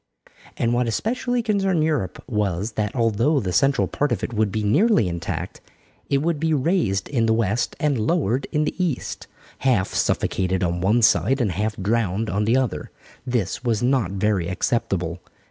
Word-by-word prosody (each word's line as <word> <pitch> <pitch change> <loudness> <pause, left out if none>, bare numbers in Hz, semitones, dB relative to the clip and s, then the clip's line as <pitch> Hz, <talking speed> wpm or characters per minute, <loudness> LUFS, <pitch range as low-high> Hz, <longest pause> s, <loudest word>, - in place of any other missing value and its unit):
And 115 0 +1
what 120 0 +1
especially 240 - -1
concerned 195 -7 +1
Europe 145 - -1
was, 105 -3 -1
that 105 0 -3
although 115 +5 +2
the 95 -7 -3
central 135 +9 +3
part 145 -2 -1
of 120 - -1
it - - -3
would 110 -2 +1
be 110 +2 -2
nearly 185 - +3
intact, 85 -1 -4 0.5
it 140 0 +1
would 165 -2 0
be 160 0 +1
raised 135 - 0
in 115 -5 0
the 110 - +3
west 115 +1 0
and 145 -5 +1
lowered 125 - 0
in 150 0 +1
the - - -1
east, 160 -8 -3 0.3
half 120 -8 +2
suffocated 95 0 0
on 85 0 -1
one 110 +6 +2
side 135 +5 +3
and 115 -7 +1
half 105 +4 -2
drowned 105 +1 0
on 105 +2 0
the 115 +4 +3
other. 130 -7 -2 0.4
This 120 -3 -1
was 115 -2 0
not 125 -7 +1
very 100 -3 0
acceptable. 90 -2 -1
115 Hz, 175 wpm, -23 LUFS, 100-140 Hz, 0.5 s, central